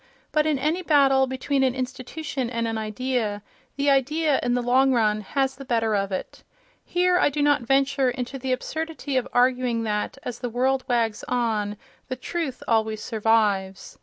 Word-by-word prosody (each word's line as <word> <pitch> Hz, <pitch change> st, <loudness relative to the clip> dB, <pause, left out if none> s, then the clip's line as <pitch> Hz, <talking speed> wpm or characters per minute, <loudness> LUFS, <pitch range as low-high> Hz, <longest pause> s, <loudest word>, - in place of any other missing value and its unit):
But 305 Hz, 0 st, +2 dB
in 305 Hz, -2 st, +2 dB
any 310 Hz, +7 st, 0 dB
battle 275 Hz, -5 st, +4 dB
between 265 Hz, +2 st, -1 dB
an 260 Hz, -1 st, +2 dB
institution 260 Hz, +1 st, -4 dB
and 230 Hz, -1 st, -2 dB
an 225 Hz, -, -2 dB
idea, 220 Hz, -1 st, -2 dB, 0.3 s
the 280 Hz, 0 st, +2 dB
idea, 290 Hz, +2 st, +2 dB
in 245 Hz, 0 st, 0 dB
the 245 Hz, -, 0 dB
long 260 Hz, +2 st, +4 dB
run, 215 Hz, -3 st, +2 dB
has 270 Hz, +5 st, -1 dB
the 275 Hz, -, -9 dB
better 230 Hz, -4 st, 0 dB
of 195 Hz, 0 st, -1 dB
it. 185 Hz, -, -5 dB, 0.4 s
Here 360 Hz, 0 st, +2 dB
I -, -, +4 dB
do 290 Hz, +1 st, -1 dB
not 290 Hz, -1 st, +3 dB
venture 270 Hz, +1 st, +2 dB
into 250 Hz, +2 st, -4 dB
the 260 Hz, 0 st, -3 dB
absurdity 315 Hz, +1 st, -3 dB
of 255 Hz, -, +1 dB
arguing 245 Hz, -2 st, +2 dB
that, 210 Hz, +3 st, -2 dB
as 240 Hz, -1 st, -5 dB
the 245 Hz, -, -3 dB
world 260 Hz, +2 st, +1 dB
wags 230 Hz, -3 st, 0 dB
on, 215 Hz, -4 st, -1 dB, 0.3 s
the 255 Hz, -, -3 dB
truth 275 Hz, +1 st, -4 dB
always 220 Hz, -1 st, +1 dB
survives. 210 Hz, -4 st, 0 dB
255 Hz, 175 wpm, -24 LUFS, 225-275 Hz, 0.4 s, battle